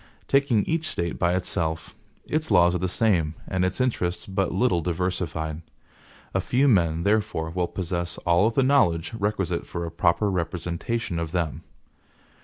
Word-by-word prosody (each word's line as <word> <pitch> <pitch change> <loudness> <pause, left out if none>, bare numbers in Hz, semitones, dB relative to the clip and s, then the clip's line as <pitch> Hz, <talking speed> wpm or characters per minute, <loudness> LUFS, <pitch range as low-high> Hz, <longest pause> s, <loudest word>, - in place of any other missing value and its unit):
Taking 135 -6 +3
each 165 0 -1
State 85 -1 -3
by 85 0 +2
itself, 80 -3 -2 0.3
its 155 +1 -1
laws 90 -4 +5
are 90 - 0
the 95 - 0
same, 85 -6 +1
and 95 -1 0
its 95 +5 -1
interests 90 -9 -1
but 95 -1 -1
little 95 -3 +2
diversified. 85 -2 -2 0.7
A - - +1
few 135 +3 +2
men, 85 - +3
therefore, 100 -6 0
will 90 0 -1
possess 85 -1 -3
all 85 +5 +4
the 125 +4 +1
knowledge 100 -11 +2
requisite 105 -4 -1
for 85 0 -4
a 85 - -5
proper 85 +4 +2
representation 85 +3 -2
of 85 0 -4
them. 85 -4 -1
90 Hz, 155 wpm, -25 LUFS, 85-105 Hz, 0.7 s, laws